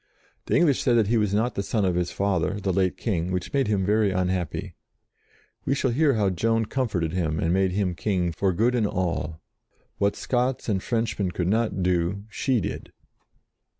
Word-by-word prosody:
The - - +1
English 150 -6 +3
said 120 -2 +3
that 110 -3 +2
he 120 - +3
was 105 -3 +1
not 110 +4 +1
the - - -2
son 105 0 0
of 90 - +1
his 90 0 0
father, 100 -1 0
the 95 -1 -1
late 95 0 +1
King, 90 -5 -1
which 90 -1 -3
made 135 -2 +2
him 100 -3 +1
very 105 +1 +3
unhappy. 90 -3 -2 0.9
We 135 - 0
shall 135 -2 0
hear 140 +1 +3
how 100 -3 +2
Joan 115 +5 +1
comforted 105 -11 -1
him 80 -4 -1
and 85 +1 +1
made 95 -1 +2
him 95 -2 0
King 90 0 -1
for 95 +3 0
good 115 +8 +2
and 115 -4 +2
all. 85 -4 -2 0.6
What 100 0 +2
Scots 125 +1 -1
and 100 -4 0
Frenchmen 115 -4 -1
could 90 -1 -2
not 110 -3 0
do, 90 +2 0
she 130 +1 +1
did. 95 - -5
100 Hz, 190 wpm, -25 LUFS, 90-115 Hz, 0.9 s, English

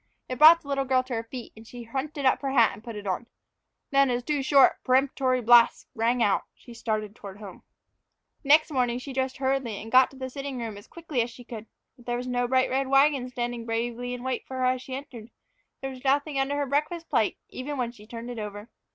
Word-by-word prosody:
It 255 -1 -5
brought 330 +2 +8
the - - -15
little 275 -1 0
girl 260 -1 +2
to 255 0 -7
her 225 -1 -2
feet, 245 +1 -9
and 220 +1 -14
she 245 0 -9
hunted 275 +4 -4
up 260 - +3
her 275 - -2
hat 235 -5 +4
and 215 - -13
put 230 -2 -7
it 205 -1 -7
on. 195 +5 -2 0.6
Then, 275 -1 +4
as 245 0 -1
two 295 +1 -1
short, 270 0 +4
peremptory 255 -1 +2
blasts 235 0 +5
rang 235 0 +1
out, 205 - +1
she 240 - -14
started 215 -2 -3
toward 195 -3 -10
home. 205 -3 -11 0.8
NEXT 305 +3 +5
morning 245 -3 +1
she 265 +2 -7
dressed 260 0 -2
hurriedly 265 -5 -1
and 225 +2 -9
got 255 0 +6
to 270 - -16
the 260 -1 -6
sitting 275 0 -5
room 230 -3 -5
as 205 - -12
quickly 320 -7 -3
as 230 - -2
she 245 +1 -13
could. 225 -2 -9 0.3
But 245 - -19
there 240 0 -1
was 250 - -5
no 245 -1 0
bright 260 +1 +2
red 265 +1 0
wagon 275 -1 +3
standing 240 -1 -4
bravely 240 +2 -2
in 245 - -9
wait 260 -1 -3
for 260 - -6
her 255 - +1
as 255 0 +1
she 260 0 -6
entered; 240 -5 -9 0.5
there 270 0 -4
was 255 0 -11
nothing 280 +1 +1
under 275 +2 0
her 290 - 0
breakfast 300 +5 -1
plate, - - +1
even, 285 +3 -5
when 240 -2 -1
she 210 -3 -16
turned 235 +1 -7
it 240 - -6
over. 210 +1 -7
255 Hz, 235 wpm, -26 LUFS, 235-270 Hz, 0.8 s, brought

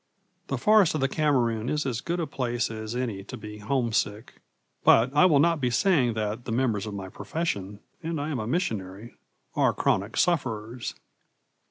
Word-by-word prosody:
The - - -2
forest 210 -7 +4
of 155 - -1
the 135 - +3
Cameroon 125 -6 +1
is 150 -1 -1
as 120 -3 -2
good 175 +1 -2
a 165 - 0
place 120 -5 -2
as 110 +1 -5
any 115 -6 -3
to 125 - -7
be 105 -1 -9
homesick; 110 -2 -1 0.4
but 125 +4 +5
I 180 +5 +7
will 155 -5 +4
not 165 +1 +3
be 125 - +2
saying 125 - +2
that 110 +2 -3
the - - -4
members 115 -4 0
of 105 - -5
my 95 -1 -5
profession 105 - -4 0.2
and 165 -1 -3
I 145 +2 -3
am 135 - -2
a 110 - -3
missionary 110 - -3 0.4
are - - +3
chronic 100 +3 0
sufferers. 120 -8 -1
120 Hz, 180 wpm, -27 LUFS, 110-150 Hz, 0.4 s, I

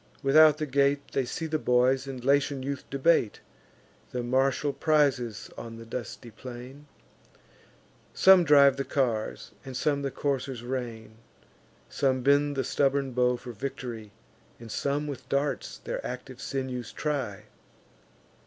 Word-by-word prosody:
Without 150 +2 +6
the 155 - -2
gate, 140 0 +1
They 135 - 0
see 160 - -4
the 155 -1 -1
boys 130 +1 +2
and 130 -2 -7
Latian 140 -1 +2
youth 140 0 -5
debate 140 -5 +2 0.7
The 125 -1 -3
martial 135 +3 +1
prizes 140 -7 +1
on 115 -1 -8
the 115 - -10
dusty 120 0 -7
plain: 125 +5 -10 1.2
Some 190 -1 +6
drive 140 -3 +6
the 135 - -1
cars, 120 -6 -2
and 130 -2 -6
some 145 0 0
the 140 - -1
coursers 135 -3 -3
rein; 120 -3 -5 0.7
Some 130 -2 0
bend 145 +1 +3
the 135 - 0
stubborn 140 -1 +1
bow 125 0 +2
for 125 0 -9
victory, 115 -2 -6 0.5
And 115 -2 -10
some 140 +5 -1
with 145 -3 -7
darts 140 +1 -1
their - - -5
active 125 +1 -7
sinews 130 -3 -4
try. 130 -9 -3
135 Hz, 135 wpm, -28 LUFS, 125-140 Hz, 1.2 s, Without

